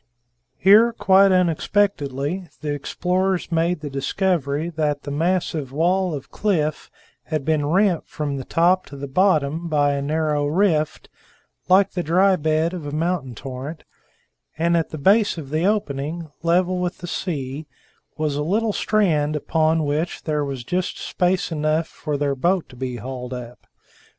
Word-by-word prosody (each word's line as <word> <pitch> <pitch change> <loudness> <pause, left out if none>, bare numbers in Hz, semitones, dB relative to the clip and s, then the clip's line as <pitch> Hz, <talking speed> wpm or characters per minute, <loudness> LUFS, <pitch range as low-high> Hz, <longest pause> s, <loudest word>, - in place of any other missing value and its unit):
Here, 215 +5 +6
quite 195 -2 +5
unexpectedly, 180 -3 0
the 150 -1 -2
explorers 180 +6 -1
made 165 0 +1
the 150 - -5
discovery 150 +1 -1
that 150 -3 -1
the 145 - -5
massive 160 -3 -1
wall 175 +3 +1
of 135 - -9
cliff 155 -8 -1 0.4
had 155 -4 -3
been 155 -2 +1
rent 185 +1 +2
from 145 -3 -3
the 135 - -5
top 175 +6 +2
to 140 - -10
the 140 +1 -5
bottom 160 0 +1
by 145 -3 +2
a 140 - -2
narrow 150 0 0
rift, 155 -2 +1 0.6
like 190 +2 +5
the 180 - -2
dry 185 +4 +3
bed 155 +1 0
of 165 -5 -6
a - - -4
mountain 155 -5 -2
torrent, 135 +6 -7 0.7
and 170 +1 +2
at 165 -1 0
the 155 - -6
base 200 +6 +3
of 145 -4 -7
the 155 +3 0
opening, 160 -5 -2
level 180 +2 +2
with 180 0 -2
the 180 - -8
sea, 150 -5 -4 0.5
was 155 -2 -1
a 145 - -1
little 210 +7 0
strand 155 -11 +1
upon 160 +1 +1
which 150 +4 -2
there 150 -2 -1
was 135 -3 -4
just 180 +7 -2
space 180 0 0
enough 155 +1 0
for 150 -1 -4
their 140 -1 0
boat 175 +6 0
to - - -14
be 125 0 -4
hauled 125 +1 -6
up. 120 -1 -10
160 Hz, 160 wpm, -22 LUFS, 145-180 Hz, 0.7 s, Here